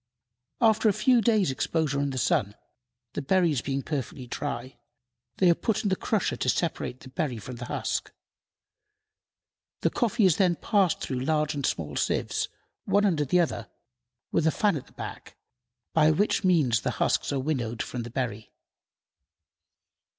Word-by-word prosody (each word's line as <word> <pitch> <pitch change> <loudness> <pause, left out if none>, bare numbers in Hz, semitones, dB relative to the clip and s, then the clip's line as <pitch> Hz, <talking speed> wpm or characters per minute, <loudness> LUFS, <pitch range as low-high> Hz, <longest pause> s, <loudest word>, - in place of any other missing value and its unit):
After 220 -1 +4
a - - +2
few 250 +2 +4
days' 215 - +3
exposure 145 +1 0
to 140 - +1
the 135 - -4
sun, 105 -3 +1 0.6
the - - -3
berries 160 -2 +2
being 135 -1 -2
perfectly 135 -3 -4
dry, 130 0 -5 0.6
they 185 - +4
are 170 - +7
put 215 +5 -1
in 205 - +1
the 190 - +2
crusher 215 +2 0
to - - -1
separate 160 -6 -1
the 130 - -11
berry 135 -4 -2
from 120 +3 -8
the 120 - -6
husk. - - -2 1.7
The - - +2
coffee 235 -2 +2
is 180 -5 +4
then 180 -3 +3
passed 195 -2 +1
through 130 -2 -2
large 150 +2 +1
and 145 -1 -4
small 75 -3 -3
sieves, - - 0 0.4
one 205 +1 +3
under 160 -7 +2
the 180 +7 +3
other, 135 -9 -1 0.6
with 160 - +2
a - - +4
fan 205 0 +2
at 140 - -6
the - - -21
back, - - -8 0.6
by 155 -1 +5
which 200 +6 +2
means 150 - +3
the - - -1
husks - - +1
are 140 - 0
winnowed 125 -5 -2
from 125 - -5
the 120 - -6
berry. 115 -4 -4
150 Hz, 165 wpm, -27 LUFS, 130-190 Hz, 1.7 s, are